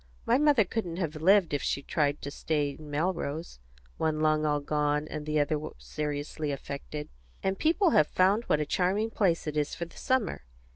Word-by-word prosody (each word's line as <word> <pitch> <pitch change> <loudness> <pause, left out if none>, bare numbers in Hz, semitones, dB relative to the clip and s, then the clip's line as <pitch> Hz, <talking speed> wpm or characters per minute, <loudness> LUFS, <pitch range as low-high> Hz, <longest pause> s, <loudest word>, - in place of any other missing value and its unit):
My - - +3
mother 290 -8 +5
couldn't 180 -4 -3
have 165 -4 -2
lived, 185 +1 +4
if 145 - 0
she 140 - -1
had - - -27
tried 145 -1 +1
to 140 - -4
stay 145 -1 -1
in 150 +1 -11
Melrose. 160 - -2 0.4
One 155 -1 0
lung 155 0 +2
all 150 0 +2
gone, 150 +1 0
and 150 -1 -6
the 155 0 +1
other 150 +1 +1 0.2
seriously 150 0 -3
affected. 140 +2 -6 0.4
And 190 0 0
people 335 +3 +3
have 150 - +5
found 200 +5 +2
out - - -23
what 150 - +3
a 150 - 0
charming 195 +8 +1
place 185 -6 +1
it 150 -1 -3
is 150 -1 0
for 170 - -4
the 170 - -16
summer. 255 - 0
155 Hz, 200 wpm, -29 LUFS, 150-185 Hz, 0.4 s, mother